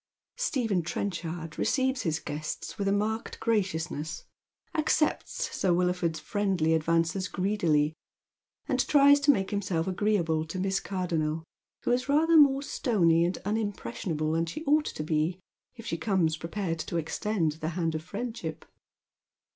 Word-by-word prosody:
Stephen 245 - 0
Trenchard 170 -2 -4
receives 260 -1 +1
his 160 -2 -1
guests 155 +5 -5
wath 200 - 0
a - - +3
marked 215 +3 -1
gracious 185 -7 0
ness, 155 +2 -5 0.5
accepts 330 +9 0
Sir 185 - +1
Wilford's 180 -2 0
friendly 185 -2 0
advances 165 +3 +1
greedily, 170 -6 +1 0.7
and - - +1
tries 285 0 +6
to 285 +1 0
make 195 -8 +3
himself 185 -5 -1
agreeable 180 -5 +1
to 160 +3 -6
MissCtirdonnel, 180 -5 -1 0.4
who - - +1
is 250 +3 0
rather 320 +4 +4
more 280 -3 +6
stony 180 - +2
and 180 - -1
unimpressionable 170 - -2
than 165 +1 0
she 310 - -6
ought 300 +1 +3
to 155 - -4
be 155 +3 0 0.4
if 230 -2 -11
she 165 -6 -3
comes 165 -3 +1
prepared 165 +1 -3
to 170 - -3
extend 165 +1 0
the 155 - -1
hand 165 -2 0
of 155 - -3
friendship. 205 -3 -5
185 Hz, 140 wpm, -28 LUFS, 160-220 Hz, 0.7 s, tries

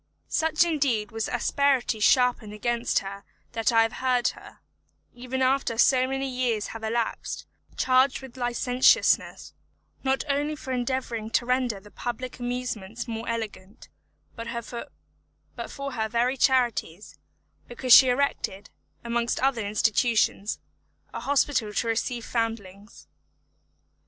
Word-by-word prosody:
Such 320 0 +2
indeed 270 -11 0
was 225 -1 -2
the - - -2
asperity 260 -2 +1
sharpened 245 -2 +3
against 235 +2 -1
her 200 +1 -7 0.3
that 225 0 0
I 225 -1 +5
have 225 +1 -2
heard 250 -2 +2
her, - - -12 0.6
even 255 +2 -3
after 260 -3 +1
so 255 +1 +4
many 270 +1 -2
years 250 -5 -1
have 225 -1 -8
elapsed, 225 +1 -2 0.3
charged 260 +1 +3
with 265 -2 -12
licentiousness, 250 +1 +2 0.5
not 265 0 +1
only 290 +2 0
for 265 -2 -7
endeavouring 245 -3 -2
to 230 +1 +1
render 250 -4 0
the 205 +1 -17
public 250 +1 -5
amusements 245 -3 -4
more 230 0 -5
elegant, 220 -3 -6 0.5
but 230 -1 -7 1.2
for 275 0 -5
her 220 -3 -2
very 240 +3 +1
charities, 240 -9 0 0.5
because 245 0 +3
she 260 - +9
erected, 245 -6 -1 0.3
amongst 235 0 -1
other 260 -4 +1
institutions, 215 0 +1 0.6
a - - -4
hospital 275 -6 +1
to 220 +3 -1
receive 230 +1 -1
foundlings. 210 -3 -4
240 Hz, 125 wpm, -26 LUFS, 225-260 Hz, 1.2 s, she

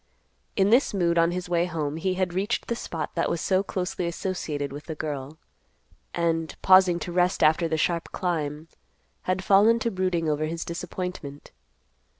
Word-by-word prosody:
In 195 +1 +3
this 240 -2 +4
mood 170 -2 +2
on 165 0 +4
his 180 +1 -3
way 175 -1 +1
home, 155 -4 -3
he 185 +3 -1
had 185 -2 -1
reached 200 +6 -1
the 235 - -2
spot 165 -7 -5
that 170 - 0
was 170 - -1
so 190 +2 +2
closely 180 -2 -3
associated 160 -6 -3
with 145 +1 -8
the 160 - -5
girl, 150 -1 -5 0.8
and, 165 -1 0
pausing 185 -2 +6
to 175 - -4
rest 180 +1 +2
after 160 +2 +4
the 160 -1 -1
sharp 170 +2 -1
climb, 160 -4 -2 0.6
had 185 +1 0
fallen 205 +4 +5
to 230 0 -1
brooding 185 -4 0
over 155 0 0
his 165 +1 -4
disappointment. 170 -4 -6
170 Hz, 170 wpm, -26 LUFS, 160-185 Hz, 0.8 s, pausing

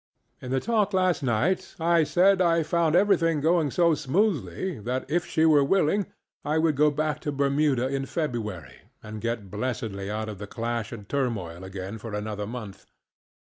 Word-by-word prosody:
In 125 - -7
the 130 +1 +1
talk 215 - 0
last 185 -3 +2
night 145 +10 0
I 165 0 +3
said 185 +6 +3
I 165 -2 +3
found 165 0 +1
everything 170 -5 +3
going 160 0 +2
so 170 +3 +3
smoothly 155 - -1
that 125 +5 -3
if 175 +3 0
she 160 - +2
were 150 -3 +5
willing 195 +4 +2 0.4
I 150 +2 0
would 160 -2 +2
go 150 +2 +4
back 150 0 -1
to 145 - -3
Bermuda 140 -2 +1
in 135 0 -2
February 115 - -4 0.2
and 110 0 -7
get 115 -5 -3
blessedly 105 -3 -3
out 110 +1 -3
of 105 -3 -7
the 105 - -6
clash 115 0 -3
and 105 -4 -9
turmoil 105 -11 -2
again 95 +3 -6
for 110 -1 -6
another 105 0 -4
month. 110 -4 -8
140 Hz, 170 wpm, -26 LUFS, 110-165 Hz, 0.4 s, were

